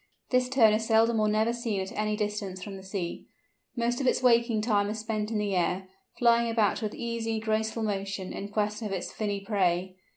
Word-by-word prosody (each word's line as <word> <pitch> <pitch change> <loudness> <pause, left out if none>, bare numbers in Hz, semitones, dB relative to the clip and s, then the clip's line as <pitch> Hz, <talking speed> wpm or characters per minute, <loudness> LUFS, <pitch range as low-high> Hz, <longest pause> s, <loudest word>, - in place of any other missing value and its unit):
This 250 0 +3
Tern 235 -5 +5
is 220 +1 0
seldom 225 0 +4
or 215 - +3
never 215 +2 +2
seen 235 -4 -2
at 190 0 -4
any 210 0 -1
distance 205 -3 -3
from 200 -2 -7
the 190 - -9
sea. 190 -2 -5 0.5
Most 240 +1 0
of 265 - 0
its 255 - +2
waking 235 -2 +4
time 205 -2 +1
is 215 - -3
spent 215 -1 -2
in 225 - -1
the 205 -2 0
air, 180 +2 0 0.3
flying 235 -1 +4
about 225 0 +1
with 215 -2 -3
easy, 230 -1 -2
graceful 220 +1 -1
motion, 195 -2 -3
in 200 - -5
quest 210 +1 -1
of 215 -3 -4
its 190 -2 -3
finny 205 -2 -2
prey. 185 -3 0
215 Hz, 205 wpm, -28 LUFS, 200-230 Hz, 0.5 s, Tern